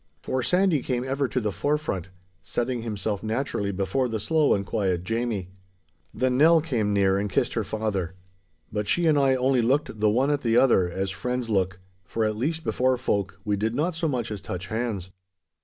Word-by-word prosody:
For 130 - -1
Sandy 180 +1 +2
came 125 -1 -1
ever 135 +1 0
to 125 - -1
the 105 -3 -1
forefront, 95 - -1 0.3
setting 120 0 -2
himself 105 -2 -3
naturally 110 -2 -1
before 100 +7 0
the 110 -2 -3
slow 155 +6 +3
and 100 -1 -2
quiet 95 -4 -1
Jamie. 110 -3 -2 0.6
Then 130 0 0
Nell 165 +2 +7
came 120 -10 -1
near 100 -1 +3
and 105 +1 -2
kissed 120 - 0
her 115 - 0
rather. 100 -5 -2 0.6
But 105 -1 -2
she 175 +9 +2
and 155 -2 +4
I 135 -1 +4
only 130 0 +2
looked 130 -1 0
the 105 0 +4
one 130 +7 +2
at 145 -1 0
the 115 -2 +2
other 105 -10 +4
as 95 +2 -2
friends 125 +4 -3
look, 95 -2 0 0.2
for 110 +4 -1
at 110 0 0
least 160 +8 -2
before 130 -3 +1
folk 100 -6 -1
we 105 -1 +1
did 110 +3 -1
not 165 +6 0
so 165 0 -1
much 120 -6 -2
as 105 -3 -5
touch 90 0 -5
hands. 110 -5 -3
115 Hz, 195 wpm, -26 LUFS, 100-130 Hz, 0.6 s, Nell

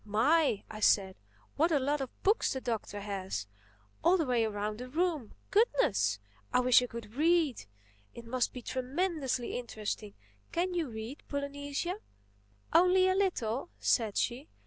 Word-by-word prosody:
"My!" 230 +3 +2
I 215 - -8
said, 195 -3 +3 0.4
"what 325 +4 +3
a 305 - +4
lot 285 +2 0
of 265 - -7
books 415 +4 +3
the 265 - -3
Doctor 220 -4 -3
has—all 105 - -2
the 325 - 0
way 245 -3 +2
around 210 0 -3
the 250 0 -7
room! 315 - -1 0.2
Goodness! 105 - +3 0.3
I - - +4
wish 250 -1 +6
I 250 - -2
could 230 -2 -8
read! 310 - +2 0.5
It 235 - -9
must 245 +1 0
be 250 - -8
tremendously 265 -2 -1
interesting. 215 -3 -5 0.4
Can 360 +2 0
you 335 -6 -1
read, 225 +5 -7
Polynesia?" 285 +6 -3 0.7
"Only 365 +2 +5
a - - +3
little," 345 - 0
said 220 -4 +1
she. 255 +5 -1
250 Hz, 145 wpm, -31 LUFS, 215-320 Hz, 0.7 s, wish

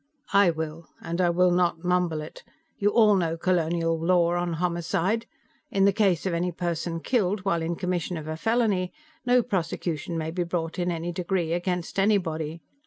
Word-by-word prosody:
"I 200 -2 +6
will, 160 0 -4
and 170 +2 -3
I 175 - +3
will 180 +1 +3
not 175 -1 +1
mumble 180 -3 +1
it. 150 - -10 0.4
You 205 -1 +3
all 215 -1 +5
know 165 -3 0
colonial 165 -1 +1
law 175 -1 +3
on 175 -1 -1
homicide. 175 +6 -1 0.4
In 195 0 +2
the 200 - +4
case 195 -5 +2
of 185 - 0
any 175 +2 0
person 170 -1 -3
killed 205 -4 +1
while 170 -4 +1
in 165 +1 -2
commission 180 -1 -2
of 155 -1 -7
a 155 - -3
felony, 210 -2 +1 0.4
no 245 0 +5
prosecution 170 - -2
may 160 0 -2
be 175 +2 -2
brought 170 -1 -3
in 175 0 0
any 170 0 -2
degree, 175 -1 -1
against 180 +1 -2
anybody. 165 -6 0
175 Hz, 175 wpm, -26 LUFS, 165-185 Hz, 0.4 s, I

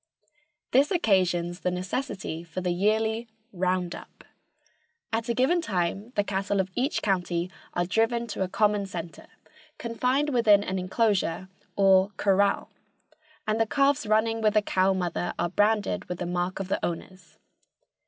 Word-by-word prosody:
This 275 +3 +4
occasions 180 - +1
the - - 0
necessity 180 -2 -4
for 170 +2 -6
the 180 -1 -1
yearly 220 +5 +1 0.3
"round 180 -1 0
up." - - -12 0.9
At 225 +1 -1
a 235 - +1
given 305 +8 +2
time 195 - -2
the 205 - +2
cattle 200 0 -1
of 190 0 -1
each 265 +8 -1
county 180 -2 0 0.2
are 175 - +1
driven 225 +5 +1
to 205 - -4
a 190 - +1
common 210 0 +1
center, 170 -3 -7 0.5
confined 250 +5 0
within 215 -5 +5
an 190 -1 -2
inclosure 185 -2 0 0.3
or 195 -1 +5
"corral," 200 0 +2 0.8
and 215 +1 +1
the 225 - +2
calves 280 0 +2
running 225 +1 +2
with 215 -1 +2
the 215 - +4
cow 190 -1 +2
mother 175 -1 -2
are 175 - 0
branded 205 +2 +1
with 180 - -5
the 175 - -4
mark 175 +2 -2
of 195 - -3
the 195 - -2
owners. 185 +2 -6
195 Hz, 155 wpm, -27 LUFS, 180-225 Hz, 0.9 s, within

